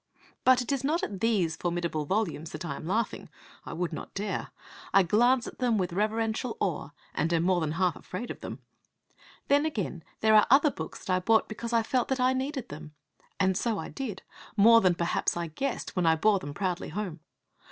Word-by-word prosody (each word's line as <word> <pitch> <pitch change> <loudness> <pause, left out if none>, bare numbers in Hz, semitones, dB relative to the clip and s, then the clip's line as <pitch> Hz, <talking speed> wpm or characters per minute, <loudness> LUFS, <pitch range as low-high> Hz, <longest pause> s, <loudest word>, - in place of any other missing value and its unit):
But 255 -1 +5
it 245 - -4
is 275 -2 -1
not 310 +5 +1
at 195 -2 -3
these 190 -8 +1
formidable 170 -3 -2
volumes 165 -4 -1
that 155 +3 -5
I 140 -4 -3
am 155 - -8
laughing. 220 +5 -1 0.4
I - - -5
would 175 -1 -2
not - - -7
dare. 200 -1 -2 0.5
I 195 - +7
glance 240 +7 +3
at - - -9
them 245 -3 +2
with 180 -3 -1
reverential 220 +4 -1
awe, 150 -6 -1 0.2
and 165 +2 0
am 165 -1 +2
more 180 -1 +2
than 155 -1 -1
half 180 0 +1
afraid 205 +7 -6
of - - -8
them. - - -7 0.8
Then, 285 +1 +4
again, 205 - -3 0.2
there 220 0 +4
are 215 -1 +6
other 285 +4 +6
books 160 -8 -7
that 185 - 0
I - - +2
bought 220 +4 +3
because 230 +2 -6
I 230 -1 +3
felt 250 +2 0
that 265 -1 -1
I 255 +1 +3
needed 265 0 -3
them. 150 +1 -9 0.4
And 190 -1 +3
so 225 +2 0
I - - -5
did, 230 -9 -5 0.3
more 230 +3 +7
than 185 -3 +3
perhaps 170 0 0
I 170 - -1
guessed 265 - -3
when 180 -3 +1
I 160 - +5
bore 200 +4 +3
them 145 -4 -7
proudly 185 -3 -2
home. 185 -6 -4
200 Hz, 210 wpm, -28 LUFS, 170-235 Hz, 0.8 s, I